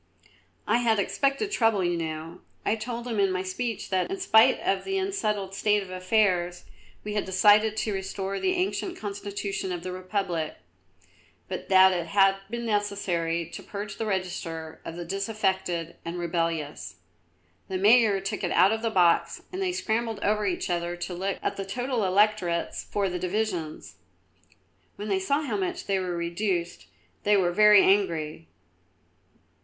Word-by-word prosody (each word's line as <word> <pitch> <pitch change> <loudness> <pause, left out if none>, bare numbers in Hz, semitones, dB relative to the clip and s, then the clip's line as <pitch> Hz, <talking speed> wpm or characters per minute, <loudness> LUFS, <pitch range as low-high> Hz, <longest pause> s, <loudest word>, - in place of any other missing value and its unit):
"I 230 +3 +2
had 230 -2 +2
expected 275 - 0
trouble, 225 - +2
you 175 0 +1
know. 165 +1 -5 0.2
I 215 - +2
told 235 +1 -5
them 230 -4 -2
in 195 -1 +3
my 185 0 -1
speech 220 +4 -4
that, 185 - +1
in 385 0 -4
spite 220 -12 +5
of 195 - 0
the 390 0 -2
unsettled 215 - -1
state 210 +1 +2
of 185 - -11
affairs, 185 -2 +1 0.4
we 210 - -4
had 210 - 0
decided 210 +3 +4
to 215 -1 -1
restore 195 0 -3
the 375 -1 +1
ancient 365 0 -2
Constitution 200 -2 -4
of 175 -1 -4
the 185 - -4
Republic, 185 -3 -3 0.9
but 185 - -6
that 190 0 +7
it 170 -2 -2
had 195 +2 +4
been 235 +1 -4
necessary 190 -6 -1
to - - -7
purge 205 0 -7
the 225 - -2
register 165 -4 -4
of 165 - -7
the 175 0 -6
disaffected 190 -3 -2
and 170 +1 -5
rebellious. 165 -3 -2 0.7
The 190 - -2
Mayor 210 0 +5
took 200 +2 -4
it 175 - 0
out 195 - +5
of 220 0 -1
the 230 - 0
box 170 -4 +2
and 375 - -3
they 375 -1 +1
scrambled 225 - -1
over 210 0 +1
each 180 -1 -2
other 175 0 -1
to 175 +1 -5
look 190 +2 -2
at - - -1
the 195 - -2
total 245 +4 -2
electorates 185 -3 +1
for 200 -1 -1
the 180 -1 -3
divisions. 175 - -3 1.0
When 210 +1 -6
they 195 -1 +2
saw 280 +11 0
how 230 -8 -2
much 190 -2 -3
they 195 -1 +1
were 180 -2 -3
reduced 170 0 -2 0.3
they 205 0 +3
were 180 -2 +2
very 210 +1 +7
angry. 165 -5 +1
195 Hz, 165 wpm, -27 LUFS, 175-215 Hz, 1.0 s, that